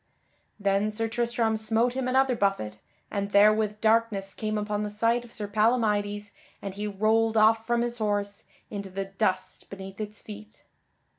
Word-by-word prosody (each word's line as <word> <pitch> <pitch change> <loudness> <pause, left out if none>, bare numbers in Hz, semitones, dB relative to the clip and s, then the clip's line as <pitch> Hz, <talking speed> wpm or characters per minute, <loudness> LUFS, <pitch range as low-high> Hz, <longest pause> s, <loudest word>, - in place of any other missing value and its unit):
Then 200 +1 +2
Sir 225 +1 -2
Tristram 235 -1 0
smote 225 +3 +1
him 260 -1 -2
another 260 0 +3
buffet, 195 - -1 0.3
and 200 -1 -2
therewith 210 +1 +4
darkness 220 -3 +2
came 215 0 -2
upon 210 0 -2
the 210 - -2
sight 230 +3 +1
of 240 - -14
Sir 210 -3 -5
Palamydes 210 -1 +1 0.3
and 195 -1 -6
he 205 +2 -4
rolled 220 +2 +2
off 220 +1 +4
from 235 0 +2
his 240 0 -3
horse 205 -1 -2 0.3
into 200 -2 -5
the 195 +1 -4
dust 190 -1 -2
beneath 195 +1 -8
its 210 0 -6
feet. 105 0 -11
210 Hz, 160 wpm, -27 LUFS, 200-225 Hz, 0.3 s, therewith